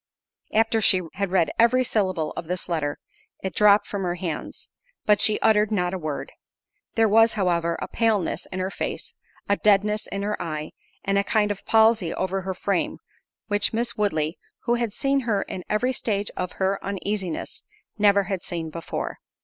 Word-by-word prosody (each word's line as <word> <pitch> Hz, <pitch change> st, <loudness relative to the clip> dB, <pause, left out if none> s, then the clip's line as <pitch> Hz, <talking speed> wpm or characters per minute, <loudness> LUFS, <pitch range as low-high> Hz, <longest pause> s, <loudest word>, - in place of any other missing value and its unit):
After 225 Hz, 0 st, +2 dB
she 185 Hz, -2 st, +5 dB
had 195 Hz, 0 st, -2 dB
read 180 Hz, -3 st, +2 dB
every 245 Hz, +3 st, +5 dB
syllable 185 Hz, -9 st, 0 dB
of 165 Hz, -, -6 dB
this 180 Hz, +1 st, -3 dB
letter, 155 Hz, -4 st, -1 dB, 0.5 s
it 190 Hz, -, -3 dB
dropped 210 Hz, 0 st, +5 dB
from 200 Hz, -, -4 dB
her 175 Hz, -2 st, -1 dB
hands; 170 Hz, -3 st, -5 dB, 0.4 s
but 210 Hz, -1 st, +4 dB
she 215 Hz, -, +4 dB
uttered 215 Hz, -1 st, +4 dB
not 180 Hz, -3 st, 0 dB
a 190 Hz, -, -2 dB
word. 155 Hz, -3 st, -4 dB, 0.6 s
There 225 Hz, -1 st, +4 dB
was, 225 Hz, +2 st, +5 dB
however, 170 Hz, -4 st, +1 dB
a -, -, -4 dB
paleness 220 Hz, -6 st, 0 dB
in 185 Hz, -, -6 dB
her 185 Hz, +1 st, -2 dB
face, -, -, -4 dB, 0.3 s
a 200 Hz, -, +2 dB
deadness 210 Hz, +1 st, +2 dB
in 200 Hz, 0 st, -4 dB
her 210 Hz, +1 st, -2 dB
eye, 155 Hz, -2 st, -4 dB, 0.3 s
and 195 Hz, 0 st, +2 dB
a -, -, +2 dB
kind 210 Hz, 0 st, +1 dB
of 200 Hz, -, -5 dB
palsy 220 Hz, -6 st, +4 dB
over 190 Hz, +1 st, -1 dB
her 190 Hz, 0 st, -4 dB
frame, 195 Hz, -1 st, -1 dB, 0.5 s
which 205 Hz, 0 st, +1 dB
Miss 235 Hz, +1 st, -1 dB
Woodley, 160 Hz, -7 st, 0 dB, 0.2 s
who 240 Hz, -, +1 dB
had 235 Hz, -2 st, 0 dB
seen 275 Hz, +5 st, +1 dB
her 225 Hz, -6 st, 0 dB
in 180 Hz, -, -6 dB
every 250 Hz, +5 st, +1 dB
stage 205 Hz, -4 st, -1 dB
of 180 Hz, 0 st, -3 dB
her 195 Hz, +1 st, 0 dB
uneasiness, 195 Hz, -2 st, -3 dB, 0.4 s
never 200 Hz, -1 st, +5 dB
had 190 Hz, -1 st, -3 dB
seen 170 Hz, -4 st, -5 dB
before. 165 Hz, 0 st, -5 dB
200 Hz, 180 wpm, -24 LUFS, 180-215 Hz, 0.6 s, she